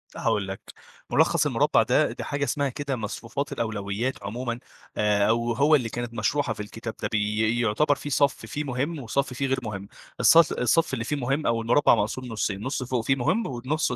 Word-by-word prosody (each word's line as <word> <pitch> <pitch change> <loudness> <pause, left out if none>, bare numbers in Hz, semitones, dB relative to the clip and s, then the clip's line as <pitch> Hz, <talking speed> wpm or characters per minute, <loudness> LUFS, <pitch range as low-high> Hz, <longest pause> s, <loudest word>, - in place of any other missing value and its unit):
هاقول 100 -2 0
لك، 95 0 -6 0.5
ملخص - - +3
المربع - - +3
ده، - - +2
دي - - -6
حاجة 145 0 -2
اسمها 140 0 0
كده 140 +1 -3
مصفوفات 115 +5 -4
الأولويات 110 +2 -3
عمومًا، 120 +3 -4 0.4
آآ، 105 -1 +3
أو 115 +1 +1
هو 145 +5 +4
اللي 125 -6 0
كانت 120 0 -5
مشروحة 115 +3 0
في - - -15
الكتاب 110 +2 -6
ده، - - 0
بي 110 +2 +1
يُعتبر 120 +7 +2
فيه 145 - -7
صف 140 0 +1
فيه 150 - -4
مهم، 140 +4 -2
وصف 135 +2 -1
فيه 135 +2 -1
غير 135 0 0
مهم، 100 -3 -5 0.3
الص - - +6
الصف 140 +5 +2
اللي 115 -3 -2
فيه 150 - -1
مهم، 135 +2 -1
أو 115 0 +1
المربع 120 +6 +4
مقسوم 115 +5 -2
نُصين، 105 -4 -2
نُص 130 0 -2
فوق 125 -2 -2
فيه 135 - +3
مهم، 165 - 0
ونُصه 130 +2 -1
120 Hz, 195 wpm, -26 LUFS, 110-140 Hz, 0.5 s, الص